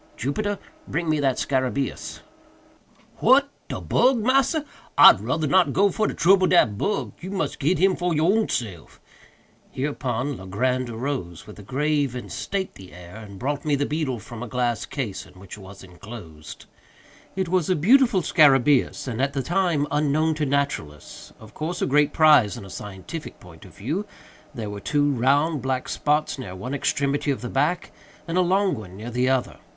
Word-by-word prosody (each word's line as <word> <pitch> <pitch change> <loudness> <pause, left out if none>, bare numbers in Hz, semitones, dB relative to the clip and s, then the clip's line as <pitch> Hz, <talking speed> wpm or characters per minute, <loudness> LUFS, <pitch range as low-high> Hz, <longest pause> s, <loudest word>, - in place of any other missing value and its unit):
Jupiter; 205 - -2 0.3
bring 165 +2 -2
me 155 - +1
that 135 -3 +1
scarabæus!" 130 0 -2 1.0
"What! 275 +4 +4 0.2
de - - -5
bug, 255 +1 +2
massa? 270 +6 +2 0.3
I'd - - +9
rudder 160 -1 -1
not 180 +5 +3
go 200 0 +3
fer 215 +4 0
trubble 185 +3 +3
dat 120 - +4
bug—you 190 - -3
mus' 195 0 -2
git 160 +5 0
him 185 +3 +3
for 180 0 -1
your 155 +1 +2
own 220 -1 +1
self." 100 -9 -5 0.7
Hereupon 130 -1 -3
Legrand 125 +7 -1
arose, 115 - -5
with 105 - -12
a - - -9
grave 140 +3 -1
and 125 - -7
stately 190 - -5
air, 90 +3 -12
and 105 -3 -11
brought 145 +5 -3
me 150 -2 +1
the 145 +1 0
beetle 150 -4 -2
from 115 +1 -10
a 125 - -5
glass 120 0 -1
case 110 -9 -5
in 90 - -18
which 95 -1 -10
it - - -14
was 95 0 -12
enclosed. 90 -4 -11 0.7
It 190 -1 -1
was 180 -2 +1
a 185 - +3
beautiful 225 - +4
scarabæus, 140 -3 +3
and, 125 0 -3
at 140 +1 0
that 135 -2 -3
time, 175 -5 +1
unknown 150 +2 +1
to 150 -1 -2
naturalists—of 110 - -4
course 170 +3 -4
a - - +1
great 150 +1 +3
prize 150 -10 +5
in - - -9
a 95 - -11
scientific 105 - -8
point 85 -4 -15
of - - -16
view. 155 - -3 0.5
There 110 -4 -5
were 100 - -6
two 145 +6 +1
round, 140 +4 +1
black 130 0 -2
spots 150 -1 0
near 95 -7 -7
one 105 +9 -6
extremity 140 +1 -1
of 140 - -1
the 125 - -5
back, 150 +8 0 0.4
and 165 - -3
a 185 - +4
long 190 +2 +2
one 95 -4 -8
near 115 +4 -7
the 125 +2 +1
other. 130 -2 -1
140 Hz, 175 wpm, -24 LUFS, 115-165 Hz, 1.0 s, I'd